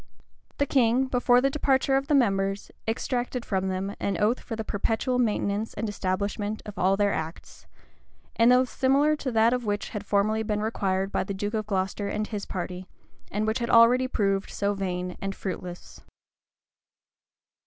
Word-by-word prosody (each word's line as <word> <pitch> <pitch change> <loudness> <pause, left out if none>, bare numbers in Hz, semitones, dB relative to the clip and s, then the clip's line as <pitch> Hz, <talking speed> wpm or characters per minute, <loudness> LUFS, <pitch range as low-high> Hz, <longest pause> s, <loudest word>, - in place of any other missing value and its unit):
The 285 - +2
king, 255 -1 +3
before 245 -1 +3
the 275 +1 +2
departure 270 -1 +2
of 270 +1 0
the 295 - +3
members, 195 -5 +1 0.2
exacted 245 +2 -2
from 190 -1 -1
them 190 +2 -3
an 195 -3 -1
oath 220 +4 +2
for 230 - -6
the 220 - -4
perpetual 225 +5 -1
maintenance 210 -2 0
and 220 +2 -2
establishment 205 +2 -2
of 210 - -8
all 190 +2 +3
their 205 -1 +2
acts; 160 +1 -6 0.7
an 230 +2 +5
oath 250 0 +4
similar 280 +3 +3
to 265 -3 -3
that 230 +2 +3
which 205 -2 -2
had 210 -2 -5
formerly 210 +2 +1
been 210 -1 -1
required 195 -3 -1
by - - 0
the 195 +1 -5
duke 205 +3 -3
of 215 -1 -2
Glocester 195 0 -1
and 210 +1 -2
his 210 -2 -5
party, 180 0 -5 0.4
and 210 +2 -1
which 220 +3 0
had 235 - -2
already 240 +3 +6
proved 195 -5 0
so 205 0 -1
vain 180 -2 -3
and 195 0 -3
fruitless. 180 -2 -7
210 Hz, 170 wpm, -26 LUFS, 195-245 Hz, 0.7 s, already